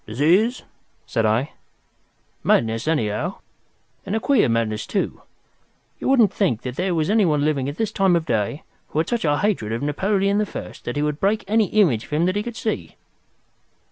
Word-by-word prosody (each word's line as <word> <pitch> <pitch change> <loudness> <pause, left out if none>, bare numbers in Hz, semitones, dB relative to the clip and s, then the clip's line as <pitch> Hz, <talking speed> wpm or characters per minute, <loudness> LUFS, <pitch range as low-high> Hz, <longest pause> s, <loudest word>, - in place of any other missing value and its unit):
"Disease?" 175 - +2 0.4
said 115 -3 0
I. 115 +7 +1 0.9
"Madness, 115 +3 +1
anyhow. 150 - -1 0.7
And 200 +2 -3
a - - +1
queer 255 - +3
madness, 110 -2 -1
too. 200 - -2 0.8
You - - -2
wouldn't 235 -7 +4
think 125 - 0
there 170 +9 -2
was 160 +4 0
anyone 165 -10 +3
living 140 -3 0
at 145 - -7
this 220 -2 -1
time 195 -4 +3
of 165 -2 0
day 115 +2 -1 0.2
who - - -7
had 160 - +1
such 235 -6 -1
a 145 -1 +2
hatred 185 - 0
of 115 +4 -2
Napoleon 195 +7 +1
the 210 - +1
First - - -8
that 120 - -3
he 145 - 0
would 150 0 -1
break 205 +3 +1
any 220 +1 +3
image 175 - +2
of - - -18
him 160 +3 +2
that 185 +1 0
he 205 - +1
could 235 +1 -6
see." 225 -3 -3
165 Hz, 185 wpm, -22 LUFS, 125-205 Hz, 0.9 s, wouldn't